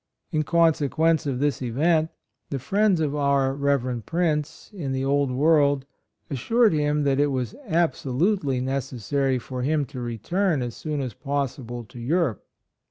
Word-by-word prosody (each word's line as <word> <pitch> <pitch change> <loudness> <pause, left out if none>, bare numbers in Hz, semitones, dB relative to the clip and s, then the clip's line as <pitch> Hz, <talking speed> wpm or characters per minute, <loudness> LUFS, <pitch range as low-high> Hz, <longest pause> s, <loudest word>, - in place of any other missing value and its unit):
In 155 - +1
consequence 160 -1 +2
of 135 -3 -1
this 140 -1 0
event, 155 +6 +2 0.4
the 140 - -2
friends 195 - +2
of 150 -3 0
our 140 -2 +2
Rev. 135 -4 0
Prince 155 - -2
in 145 -9 -4
the 130 0 -1
Old 140 0 +2
World 145 0 +3 0.4
assured 225 - +2
him 150 -1 +1
that 140 -1 +2
it 145 - +4
was 130 - -2
absolutely 160 -2 +1
necessary 135 0 -1
for 125 +1 -6
him 145 +2 +1
to 125 0 -8
re 120 -1 -4
turn 170 - 0
as 120 -2 -5
soon 150 -2 -3
as 125 -4 -4
possible 130 -3 -3
to 120 +2 -12
Europe. 140 - 0
140 Hz, 155 wpm, -25 LUFS, 130-155 Hz, 0.4 s, it